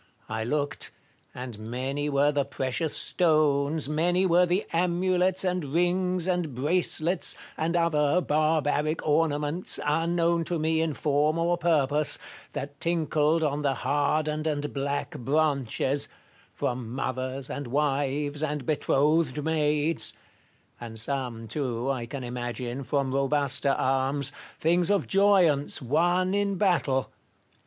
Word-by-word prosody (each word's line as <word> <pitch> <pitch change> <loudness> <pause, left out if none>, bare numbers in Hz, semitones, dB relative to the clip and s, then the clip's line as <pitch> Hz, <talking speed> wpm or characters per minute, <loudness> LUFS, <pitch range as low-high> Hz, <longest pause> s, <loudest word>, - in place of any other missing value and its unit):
I 110 0 -2
looked; 145 +4 -2 0.4
and 125 -4 -7
many 130 +6 -3
were 145 +1 +3
the 145 -1 +1
precious 135 +3 -2
stones, 155 -3 +2
many 175 +5 +1
were 180 0 +4
the 180 +4 0
amulets 180 +2 +1
and 180 -2 0
rings 175 +4 0
and 175 -7 -1
bracelets, 170 +4 0 0.2
and 165 +2 -1
other 165 -1 +2
barbaric 155 -1 +1
ornaments, 150 +2 0
unknown 165 +2 +1
to 175 - -1
me 160 +1 +1
in 160 -3 -1
form 150 +2 +1
or 170 +1 +2
purpose, 150 -4 +1 0.4
that 140 0 -6
tinkled 160 -1 +1
on 145 -1 0
the 140 -2 +1
hardened 150 +3 0
and 145 -1 -2
black 140 +1 -3
branches, 140 0 0 0.4
from 120 -2 -3
mothers 130 0 -3
and 145 -2 -5
wives 145 +1 0
and 150 -3 -2
betrothed 150 0 +1
maids; 155 0 +1 0.6
and 115 -2 -7
some, 120 -2 -2
too, 125 0 -2
I 120 -3 -3
can 135 +1 -6
imagine, 120 +1 -4
from 135 0 -1
robuster 140 0 +1
arms 135 +1 0
— - - -21
things 170 +2 +2
of 205 -1 +2
joyance, 185 -9 +3
won 175 +7 +1
in 200 -1 +1
battle. 165 -9 +1
150 Hz, 125 wpm, -27 LUFS, 135-165 Hz, 0.6 s, were